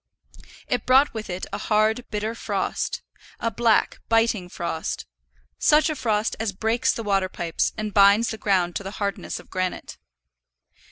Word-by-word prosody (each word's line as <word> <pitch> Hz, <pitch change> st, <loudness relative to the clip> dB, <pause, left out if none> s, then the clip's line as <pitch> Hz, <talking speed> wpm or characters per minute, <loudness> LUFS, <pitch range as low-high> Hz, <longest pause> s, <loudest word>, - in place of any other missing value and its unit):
It 245 Hz, -3 st, -1 dB
brought 265 Hz, +3 st, +5 dB
with 220 Hz, -2 st, -6 dB
it 180 Hz, +1 st, -4 dB
a -, -, -2 dB
hard, 220 Hz, +3 st, +1 dB
bitter 215 Hz, +1 st, -2 dB
frost, 230 Hz, -, -2 dB, 0.4 s
a 230 Hz, -, -1 dB
black, 230 Hz, -2 st, +2 dB
biting 225 Hz, -5 st, +2 dB
frost, 165 Hz, -2 st, -4 dB, 0.5 s
such 305 Hz, +1 st, +4 dB
a -, -, -3 dB
frost 220 Hz, -4 st, 0 dB
as 220 Hz, -3 st, -1 dB
breaks 225 Hz, +5 st, +1 dB
the 230 Hz, -, -4 dB
water 195 Hz, -2 st, +1 dB
pipes, 170 Hz, -2 st, -1 dB
and 215 Hz, -1 st, -3 dB
binds 200 Hz, +3 st, +6 dB
the 220 Hz, -, -6 dB
ground 180 Hz, -4 st, +1 dB
to -, -, -6 dB
the 195 Hz, +2 st, -7 dB
hardness 200 Hz, -1 st, -3 dB
of -, -, -16 dB
granite. 185 Hz, -1 st, -3 dB
215 Hz, 160 wpm, -24 LUFS, 195-230 Hz, 0.5 s, binds